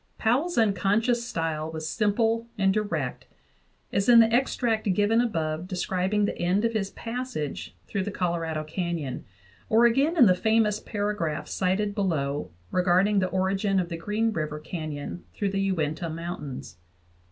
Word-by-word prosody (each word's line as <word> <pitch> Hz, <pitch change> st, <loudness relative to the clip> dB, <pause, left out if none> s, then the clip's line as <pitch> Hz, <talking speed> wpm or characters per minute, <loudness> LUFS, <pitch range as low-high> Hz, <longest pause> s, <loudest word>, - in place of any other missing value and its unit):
Powell's 270 Hz, +10 st, +1 dB
unconscious 225 Hz, +3 st, +2 dB
style 160 Hz, -4 st, -2 dB
was 160 Hz, -1 st, -5 dB
simple 225 Hz, +3 st, +1 dB
and 195 Hz, -1 st, +3 dB
direct, 210 Hz, 0 st, -2 dB, 0.7 s
as 200 Hz, +4 st, +1 dB
in 235 Hz, -1 st, +9 dB
the 225 Hz, 0 st, +5 dB
extract 235 Hz, -4 st, +1 dB
given 210 Hz, +4 st, +3 dB
above 165 Hz, -7 st, -2 dB
describing 190 Hz, +2 st, 0 dB
the -, -, -2 dB
end 185 Hz, +5 st, +1 dB
of 230 Hz, -, 0 dB
his 200 Hz, -3 st, -1 dB
passage 230 Hz, -, -5 dB
through 195 Hz, -3 st, -2 dB
the -, -, -2 dB
Colorado 170 Hz, -5 st, -2 dB
Canyon, 160 Hz, -4 st, -3 dB, 0.4 s
or 230 Hz, +2 st, +5 dB
again 275 Hz, +8 st, +3 dB
in 255 Hz, -, +8 dB
the 185 Hz, -, +6 dB
famous 215 Hz, +2 st, +2 dB
paragraphs 205 Hz, -8 st, -3 dB
cited 195 Hz, +2 st, 0 dB
below 150 Hz, -, -1 dB, 0.2 s
regarding 185 Hz, +3 st, +3 dB
the 185 Hz, -, +1 dB
origin 190 Hz, +1 st, +1 dB
of 175 Hz, -2 st, -2 dB
the 170 Hz, -, -3 dB
Green 215 Hz, +6 st, 0 dB
River 155 Hz, -3 st, -3 dB
canyon 155 Hz, 0 st, -6 dB
through 200 Hz, -, 0 dB
the 195 Hz, 0 st, 0 dB
Uinta 170 Hz, -4 st, -1 dB
Mountains. 155 Hz, -, -6 dB
195 Hz, 150 wpm, -26 LUFS, 165-220 Hz, 0.7 s, in